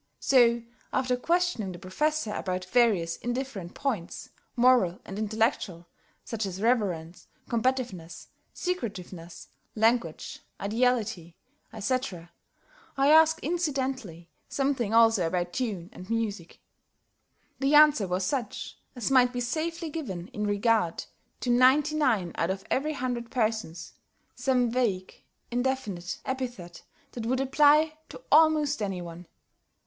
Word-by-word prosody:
So, 235 -3 +4 0.3
after 255 -1 +1
questioning 330 - 0
the - - -8
Professor 220 - -1
about 185 -2 -3
various 190 -6 +2
indifferent 240 -8 -4
points, 225 -12 -3 0.3
moral 240 -8 +4
and 195 +1 -6
intellectual, 215 -5 -1 0.4
such 225 -1 -3
as 190 0 -6
reverence, 195 -8 -1 0.2
combativeness, 235 -9 -2 0.2
secretiveness, 190 - -5 0.3
language, 220 -7 0 0.2
ideality, 210 -6 0 0.4
etc., 215 -6 -3 0.7
I 275 +2 +4
asked 320 0 +6
incidentally 265 - -3 0.2
something 270 -6 0
also 225 -6 +5
about 175 0 -2
tune 200 -8 -3
and 185 +2 -11
music. 215 -7 -3 1.0
The 275 +2 +3
answer 295 -9 +6
was 180 +1 -1
such 245 -2 -4 0.2
as 245 +1 -2
might 250 -2 +5
be 245 - -4
safely 320 +6 -3
given 195 - -5
in 210 -5 -3
regard 205 -4 +1 0.4
to 245 - 0
ninety 265 +5 +4
nine 225 - +1
out 165 - +1
of 190 0 -3
every 300 +4 0
hundred 245 -4 -3
persons 220 -8 -2 0.4
some 250 -2 +1
vague, 215 -7 -1 0.3
indefinite 235 -8 -2
epithet 245 -10 -5 0.3
that 230 -2 -5
would 260 +2 +1
apply 300 +3 +4
to - - -10
almost 305 -4 +4
any 195 -3 -2
one. 170 0 -10
235 Hz, 120 wpm, -27 LUFS, 185-265 Hz, 1.0 s, asked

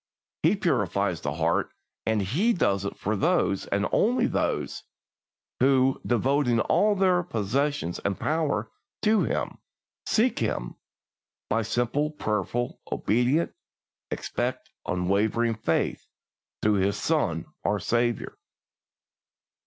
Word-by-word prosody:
He - - +4
purifies - - 0
the - - -2
heart, - - +1 0.4
and 110 -2 +2
He 175 - +2
does 100 - +1
it 100 - -4
for 110 +2 -1
those, 150 - +1
and 100 +1 0
only 245 +2 +3
those - - -1 0.8
who, 130 0 +3
devoting 120 +1 +2
all 210 - +3
their 185 -2 +3
possessions 135 - -1
and 100 -1 -2
powers 150 -9 0 0.4
to 215 0 +4
Him, - - -2 0.5
seek 230 +3 +2
Him 105 - -2 0.8
by 115 - +3
simple, 120 +7 0
prayerful, 120 - -2
obedient, 125 +9 +1 0.6
expectant, - - -3
unwavering 105 +6 +1
faith 110 -7 -1 0.6
through 105 -1 +3
His 100 +1 +1
Son 90 - 0 0.2
our 100 +1 +1
Saviour. 120 +3 -1
120 Hz, 110 wpm, -26 LUFS, 105-150 Hz, 0.8 s, He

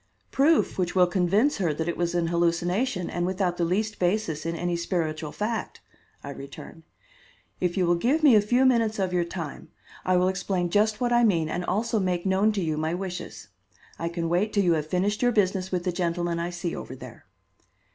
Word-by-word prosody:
"Proof 290 -5 +2
which 180 0 -1
will 180 -1 +6
convince 195 +10 +2
her 170 -7 0
that 160 +2 -3
it 170 - -1
was 175 0 -1
an 170 -1 +1
hallucination 175 +5 0
and 175 - -2
without 185 -1 -1
the 175 - 0
least 205 +5 -1
basis 175 -4 0
in 165 - -2
any 175 +1 -1
spiritual 165 -3 -2
fact," 220 +1 -3 0.4
I 140 - -6
returned. 140 +4 -10 0.8
"If 180 0 -1
you 185 - +3
will 175 - +3
give 275 - +1
me 285 -5 +7
a 210 - +6
few 245 +5 +2
minutes 230 -4 +2
of 190 -2 -1
your 175 -1 +2
time, 170 -3 -7 0.4
I 185 0 +2
will 180 +1 +3
explain 185 -2 -1
just 215 +2 +2
what 240 -1 +1
I 240 0 +4
mean 170 -8 +2
and 175 - -2
also 220 +4 0
make 180 -2 -1
known 195 +3 +3
to 195 -3 -1
you 155 -2 -1
my 160 +2 -1
wishes. 180 - -6 0.5
I 170 - -2
can 170 -1 -3
wait 180 +6 0
till 200 - +3
you 175 -2 +3
have 155 -2 -1
finished 195 +5 0
your 245 -1 +3
business 190 -4 0
with 180 -2 -1
the 180 - 0
gentlemen 175 -1 -1
I 170 +1 -2
see 175 0 -4
over - - -7
there." - - -12
180 Hz, 210 wpm, -26 LUFS, 170-205 Hz, 0.8 s, me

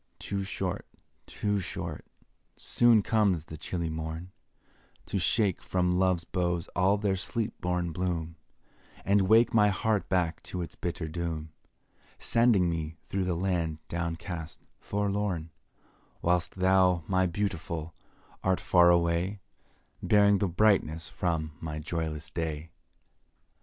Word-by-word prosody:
Too 100 -1 -3
short 95 -1 -3 0.4
too 105 -1 -1
short 90 - -5 0.5
soon 115 -3 +4
comes 100 -8 +2
the 80 - -8
chilly 85 +1 -3
morn, 80 +3 -5 0.7
To 100 - -2
shake 100 0 +1
from 90 -1 +1
love's 90 -2 +2
boughs 85 -1 -1
all 95 +3 +3
their 100 -2 0
sleep 110 +4 -2
born 90 -1 -1
bloom, 85 -2 -2 0.7
And 100 -1 +3
wake 115 +3 +5
my 105 -2 +5
heart 105 +1 0
back 85 -3 0
to 90 -1 -3
its 85 - -8
bitter 85 -1 -4
doom, 80 -1 -4 0.7
Sending 115 -6 +3
me 80 -1 -3
through 95 -1 -1
the 90 -2 0
land 85 -3 -1
down 85 -1 -2
cast, 80 -2 -7 0.2
forlorn, 100 -5 -2 0.7
Whilst 90 0 +1
thou, 95 -2 +3
my 95 0 +2
Beautiful, 85 -4 -3 0.5
art 95 -1 +2
far 85 -1 +5
away, 85 +3 +2 0.6
Bearing 100 -1 +4
the 100 - +1
brightness 90 -4 +2
from 80 -3 -2
my 80 -2 -4
joyless 80 -1 -4
day. 80 -1 -4
90 Hz, 125 wpm, -29 LUFS, 85-100 Hz, 0.7 s, wake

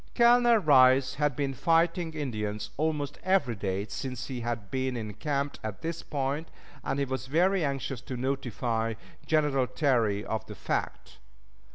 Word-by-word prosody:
Colonel 240 -1 +6
Rice 130 -6 +5
had 145 -3 +2
been 140 0 -1
fighting 165 +2 +1
Indians 105 -7 -3
almost 150 -2 -2
every 185 -10 +2
day 95 0 -2
since 125 +4 -5
he 125 -3 -5
had 115 -4 -4
been 130 -1 -1
encamped 140 +6 -3
at 110 +6 -6
this 165 0 -3
point, 145 +2 -2 0.4
and - - -1
he 140 - +1
was 130 0 -4
very 180 +6 +2
anxious 135 -3 -2
to 130 - -6
notify 120 -3 -1 0.3
General 150 -4 +2
Terry 115 -9 +1
of 110 - -2
the - - -8
fact. - - -4
135 Hz, 150 wpm, -29 LUFS, 120-155 Hz, 0.4 s, Colonel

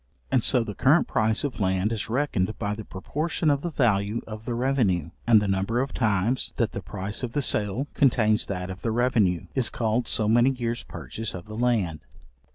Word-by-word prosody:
And 125 -4 +3
so 125 -3 +3
the 105 -2 -5
current 145 - +3
price 110 0 +1
of 140 -4 -3
land 95 +2 +1
is 115 +2 -3
reckoned 110 -6 0
by 105 -2 -2
the 110 +1 -6
proportion 150 - -1
of 140 -1 +1
the 175 - -2
value 110 -6 +1
of 110 0 -8
the 120 - -2
revenue; 115 - +1 0.2
and 115 -2 +7
the 105 - -1
number 95 +5 0
of 135 +1 -2
times, 110 +2 0
that 115 - 0
the 100 - -5
price 100 +3 -5
of 125 -2 -4
the 145 - +1
sale 105 +4 0
contains 110 -5 +3
that 90 -1 -4
of 95 - -9
the 115 - -1
revenue, 110 -7 +2
is 130 -5 +1
called 115 +1 -1
so 110 - +1
many 120 +4 +5
years 120 -3 -2
purchase 90 - -6
of 90 - -8
the 110 0 -8
land. 110 -10 0
110 Hz, 205 wpm, -26 LUFS, 100-125 Hz, 0.2 s, and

